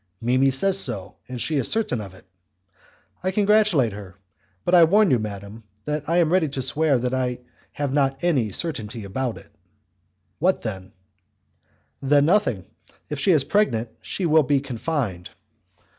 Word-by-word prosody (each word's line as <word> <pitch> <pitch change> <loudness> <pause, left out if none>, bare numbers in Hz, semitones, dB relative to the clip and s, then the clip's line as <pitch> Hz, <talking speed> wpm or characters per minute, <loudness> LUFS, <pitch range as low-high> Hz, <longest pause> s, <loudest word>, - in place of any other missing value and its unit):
"Mimi 130 +3 +2
says 190 +9 +3
so, 110 - -1
and 125 -1 -6
she 150 +6 0
is 130 - +1
certain 210 - 0
of 95 -2 -10
it." - - -18 1.0
"I 185 - -1
congratulate 200 - +3
her; 100 -3 -10 0.5
but 175 - 0
I 175 -2 +8
warn 200 +5 +4
you, 125 - +3
madam, 105 +1 -7 0.2
that 150 0 -3
I 170 - +2
am 170 -1 +2
ready 175 -5 +2
to 135 -1 -4
swear 140 +3 +2
that 125 +1 -2
I 125 -1 -1 0.4
have 145 -2 -3
not 135 -1 0
any 135 -12 +1
certainty 115 - -4
about 120 +5 -3
it." - - -15 0.9
"What 185 +4 +1
then?" 95 -4 -6 1.1
"Then 145 +1 +3
nothing. 165 - +1 0.4
If 150 - -4
she 190 - +3
is 155 -6 +4
pregnant, 120 - 0
she 190 - -4
will 160 -1 +5
be 140 0 +1
confined." 125 - -4
135 Hz, 160 wpm, -23 LUFS, 115-165 Hz, 1.1 s, I